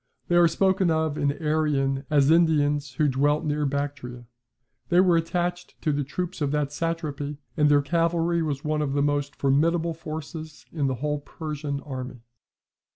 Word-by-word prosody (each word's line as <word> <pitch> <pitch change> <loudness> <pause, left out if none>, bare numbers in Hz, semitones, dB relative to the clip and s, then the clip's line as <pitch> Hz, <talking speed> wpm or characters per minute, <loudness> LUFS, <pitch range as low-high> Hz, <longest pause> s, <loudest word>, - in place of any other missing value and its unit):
They 175 - +3
are 175 0 +7
spoken 190 +2 +2
of 160 -2 +1
in 145 -1 +1
Arrian 145 -3 0
as 145 -1 +4
Indians 145 -4 +2
who 150 +3 +2
dwelt 145 +4 +1
near 150 -1 0
Bactria. 140 -3 -4 0.6
They 175 - +4
were 180 -2 +5
attached 175 +2 -2
to 155 - +2
the 145 0 0
troops 180 +5 -5
of 145 - +1
that 145 -1 -1
satrapy, 150 -3 -3 0.2
and 150 -2 +3
their 145 -1 +4
cavalry 170 +2 +1
was 145 -3 -2
one 155 0 0
of 140 -2 -1
the 140 0 +1
most 145 -1 -1
formidable 165 +5 +1
forces 155 0 -8
in 145 -4 0
the 130 - -1
whole 150 0 0
Persian 145 -1 -5
army. 130 -3 -7
150 Hz, 165 wpm, -25 LUFS, 140-165 Hz, 0.6 s, are